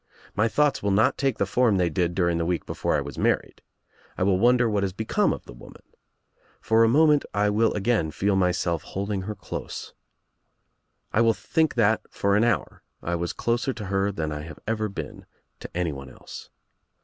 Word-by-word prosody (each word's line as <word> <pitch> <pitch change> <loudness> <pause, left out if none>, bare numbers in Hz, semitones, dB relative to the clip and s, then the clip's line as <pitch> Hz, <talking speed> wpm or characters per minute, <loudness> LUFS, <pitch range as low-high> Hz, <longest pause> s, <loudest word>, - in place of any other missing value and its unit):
My 110 +3 +3
thoughts 145 +4 +1
will 100 - 0
not 110 +7 +3
take 135 -4 0
the 100 - +1
form 110 0 +2
they 90 -2 +1
did 85 +1 0
during 85 -2 +1
the 85 - 0
week 90 -1 -1
before - - -1
I - - +1
was 70 -2 -7
married. - - 0 0.6
I - - 0
will 95 -1 +2
wonder 120 +2 +4
what 105 -2 0
has 95 -2 -1
become 110 +2 +1
of - - -5
the - - -11
woman. - - -14 0.8
For 115 0 +3
a 115 - +4
moment 150 +2 +4
I 105 0 +2
will 110 +2 +2
again 105 -5 +1
feel 100 +5 0
myself 90 -3 +1
hold 100 +2 -5
ing 100 -2 -1
her 105 +3 -5
close. 95 - -7 1.2
I 115 - +3
will 115 -1 +4
think 160 -2 0
that 110 -2 +3
for 100 0 +1
an 105 - +3
hour 115 -5 0 0.2
I 85 - -2
was 85 0 -1
closer 120 +3 -1
to 110 -4 -7
her 95 +1 0
than 80 -5 -3
I 75 0 -4
have 80 -1 -9
ever 110 0 -1
been 100 - -8 0.3
to - - -8
anyone 70 -7 -3
else. - - -11
100 Hz, 200 wpm, -25 LUFS, 90-115 Hz, 1.2 s, wonder